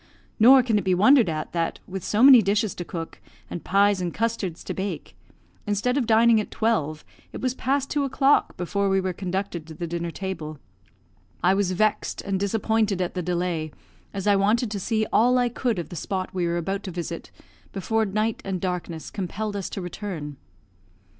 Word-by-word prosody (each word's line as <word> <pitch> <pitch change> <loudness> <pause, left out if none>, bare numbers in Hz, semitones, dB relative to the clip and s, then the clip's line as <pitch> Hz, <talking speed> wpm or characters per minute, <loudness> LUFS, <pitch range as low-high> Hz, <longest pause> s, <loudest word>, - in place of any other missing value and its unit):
Nor 255 +4 +8
can 225 -4 +2
it - - -4
be 185 -2 +2
wondered 225 +2 +5
at, 155 -1 -4
that, 165 -1 -1
with 190 0 -6
so 215 +3 +1
many 265 -3 +10
dishes 205 +1 +1
to 175 - -6
cook, 165 -1 -7 0.3
and 175 - -5
pies 200 0 +3
and 175 -1 -2
custards 220 -6 -2
to - - -4
bake, 195 +1 -5 0.5
instead 210 +5 0
of 265 -5 0
dining 225 0 +5
at - - -8
twelve, 155 -10 -1 0.3
it - - -7
was 255 -1 -1
past 275 +1 -1
two 290 -1 +1
o'clock 275 +1 +2
before 200 +3 -1
we 195 0 +3
were 185 -1 -2
conducted 185 -3 -4
to 160 - -10
the 170 - -4
dinner 170 0 -3
table. 165 -4 -5 0.9
I 180 +2 +5
was 195 -2 +1
vexed 215 +3 0
and 195 -1 -1
disappointed 215 0 0
at 180 -1 -2
the 180 - -2
delay, 175 -3 -2 0.4
as 195 -2 -5
I 205 -1 +4
wanted 210 +4 +2
to 205 - -3
see 220 +2 0
all 245 +3 +4
I 245 -1 +2
could 240 -2 -1
of 170 - -4
the 175 - -8
spot 185 +3 -3
we 180 -2 0
were 170 0 0
about 195 +3 -2
to 190 - -4
visit 170 -1 -5 0.4
before 220 +3 0
night 215 +2 -1
and 190 -2 -3
darkness 175 -3 -4
compelled 205 +2 -4
us 195 -2 -3
to 195 - -5
return. 175 -6 -6
195 Hz, 195 wpm, -25 LUFS, 175-220 Hz, 0.9 s, many